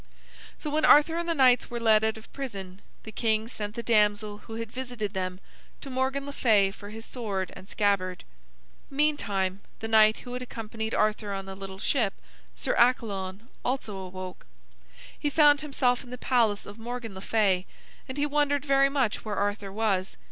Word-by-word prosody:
So 300 - -4
when 310 +1 +1
Arthur 300 +3 +7
and 340 0 -2
the 335 - +1
knights 255 -3 +4
were 240 - -4
led 220 -2 +4
out 220 0 +1
of 220 - -15
prison, 195 -8 -6 0.2
the 220 - -8
king 220 -1 +1
sent 210 -3 -5
the 235 - -4
damsel 210 -2 +2
who 225 - -9
had 225 -1 -5
visited 245 -5 -4
them 185 -1 -3 0.4
to 275 - -7
Morgan 265 +2 -1
le 285 - -5
Fay 210 -8 +3
for 205 0 -11
his 225 +1 -8
sword 200 -7 -3
and 190 - -12
scabbard. 190 -3 0 0.7
Meantime, 200 -10 0 0.2
the 225 - -4
knight 220 -1 +6
who 245 - -9
had 250 - -4
accompanied 225 -2 -4
Arthur 215 -1 +1
on 195 -1 -4
the 195 - -7
little 195 0 -8
ship, 215 0 +1 0.4
Sir - - -1
Accalon, 205 -6 +1 0.2
also 245 -5 -2
awoke. 185 -1 -8 0.7
He 295 - 0
found 290 0 +5
himself 260 -4 +1
in 250 - -14
the 250 - -6
palace 230 -5 +2
of 205 +2 -10
Morgan 235 -2 -5
le 190 - -8
Fay, 195 -4 +2 0.4
and 260 - -5
he 290 - +2
wondered 290 -1 +1
very 275 -1 +4
much 265 -6 0
where 215 -2 -3
Arthur 205 0 -1
was. 195 -3 0
220 Hz, 185 wpm, -28 LUFS, 200-255 Hz, 0.7 s, Arthur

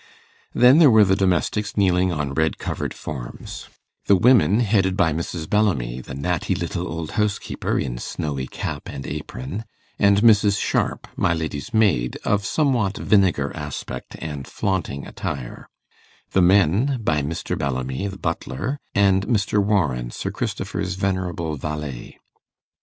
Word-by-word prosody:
Then 125 +5 +7
there 155 -4 +8
were 110 -3 +6
the 95 0 +3
domestics 100 +3 0
kneeling 90 -2 +3
on 75 -4 -2
red 80 +2 +1
covered - - -3
forms, 65 -6 -7 0.4
the 100 - +6
women 110 -1 +5
headed 95 -4 +2
by 80 -6 +3
Mrs. 80 0 -4
Bellamy, 70 - +1
the 65 - -8
natty 80 +4 -1
little - - -3
old 80 -1 -5
housekeeper, 105 -1 -1
in - - -2
snowy 70 -2 -4
cap - - -5
and 70 - -7
apron, 70 - -5 0.4
and 100 0 +4
Mrs. 105 -3 +5
Sharp, - - -1
my 85 - +1
lady's 80 - -4
maid, 100 - +2
of 100 -2 +1
somewhat 120 - +1
vinegar 90 -9 +2
aspect 75 -5 -6
and 75 -4 -6
flaunting 90 -8 -2
attire; 65 -3 -6 0.6
the 95 - +3
men 100 - +4
by 75 -6 +1
Mr. 75 +3 -3
Bellamy 65 +5 -2
the 95 -1 -6
butler, 85 - -3 0.2
and 95 -1 +3
Mr. 105 -3 +2
Warren, 75 - +1
Sir - - -4
Christopher's 95 +1 -3
venerable 90 -5 -2
valet. 75 -3 -6
90 Hz, 140 wpm, -22 LUFS, 75-100 Hz, 0.6 s, there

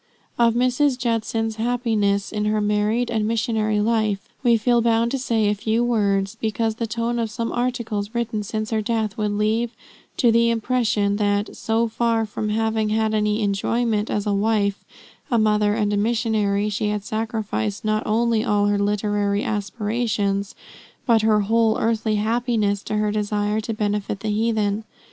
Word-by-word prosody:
Of 235 -1 +4
Mrs. 255 +2 +2
Judson's 225 -2 -1
happiness 220 -4 0
in 210 -1 -2
her 215 0 +1
married 210 +3 0
and 220 -2 0
missionary 220 -1 0
life, 215 -2 0
we 240 -3 +4
feel 240 +2 +2
bound 230 0 +2
to 270 - -1
say 225 -4 +1
a 205 - +3
few 220 +3 0
words, 200 -4 +1
because 225 0 0
the 230 - -2
tone 235 +1 -2
of 225 -1 -1
some 230 +2 -3
articles, 235 -3 -2
written 230 -2 -1
since 215 +1 -4
her 220 -1 +1
death, 220 -1 -1
would 210 -1 -1
lead 215 +3 +1 0.5
to 240 -3 +4
the 235 +1 +4
impression 225 -3 +1
that, 205 0 0
so 225 +1 0
far 230 0 0
from 210 0 -4
having 220 0 0
had 220 0 +1
any 210 0 +1
enjoyment 215 +2 0
as 205 0 -1
a 205 - +1
wife, 200 -1 0 0.5
a 235 - +2
mother, 210 -1 +2
and 210 -2 0
a - - +1
missionary, 210 -2 +1
she 210 +1 -1
had 210 -1 -2
sacrificed 215 - -3
not 215 0 +1
only 225 0 +2
all 210 -4 +2
her 205 0 +1
literary 205 0 0
aspirations, 205 -1 -2 0.5
but 230 -3 +4
her 215 -1 +3
whole 225 +1 +2
earthly 220 -1 0
happiness 215 -2 0
to 215 - -4
her 210 0 +1
desire 210 0 -1
to 220 - -4
benefit 210 -2 -2
the 220 - -2
heathen. 215 -1 0
215 Hz, 165 wpm, -22 LUFS, 210-230 Hz, 0.5 s, Of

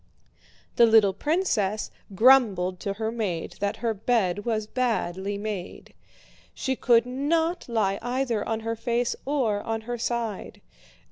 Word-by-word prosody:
The 235 - +7
little 220 -3 +5
princess 215 - 0 0.2
grumbled 200 -7 +4
to 200 - -3
her 220 +2 -3
maid 200 -8 -3
that 205 +2 -1
her 225 - +2
bed 205 -3 0
was 220 -2 -1
badly 205 -5 -2
made. 205 -3 -6 0.6
She 265 - -1
could 235 -2 +3
not 320 +6 -1
lie 205 -4 0
either 245 -2 -1
on 225 0 -2
her 225 +1 -2
face 235 +1 -1
or 240 -8 0
on 225 0 -3
her 240 +1 -5
side. 230 -3 -3
225 Hz, 135 wpm, -26 LUFS, 205-245 Hz, 0.6 s, The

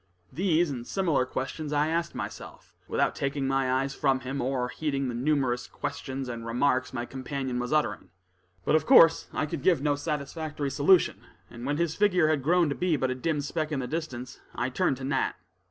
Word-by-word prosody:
These 170 0 +2
and 120 -3 -6
similar 165 -10 +1
questions 145 +4 -4
I 150 +1 +2
asked 170 -1 -1
myself, 105 -6 -8
without - - +1
taking 140 0 -2
my 135 -1 +1
eyes 135 +1 0
from 135 -1 +1
him, 135 +2 -3
or 125 0 0
heeding 140 -2 -2
the - - -3
numerous 130 -1 0
questions 135 0 -5
and 115 -2 -5
remarks 125 +3 +1
my 120 -2 -3
companion 130 0 -4
was 125 0 -3
uttering. 155 0 0 0.6
But, - - +2
of 155 - +3
course, 165 -11 +7
I - - -1
could 150 -1 -5
give 175 +1 +4
no 145 +1 +1
satisfactory 150 0 -3
solution, 160 +7 +4 0.3
and 120 +2 -7
when 145 +1 0
his 170 -1 0
figure 180 -6 +3
had 155 -3 +1
grown 170 +4 +3
to 140 - -1
be 180 -4 +1
but 130 -1 0
a - - +1
dim 150 +2 -1
speck 155 +2 -3
in 150 - -1
the 130 - -2
distance, 130 -4 -5 0.2
I 120 - -1
turned 135 -1 +1
to 135 - -8
Nat. 135 0 0
140 Hz, 200 wpm, -28 LUFS, 130-155 Hz, 0.6 s, course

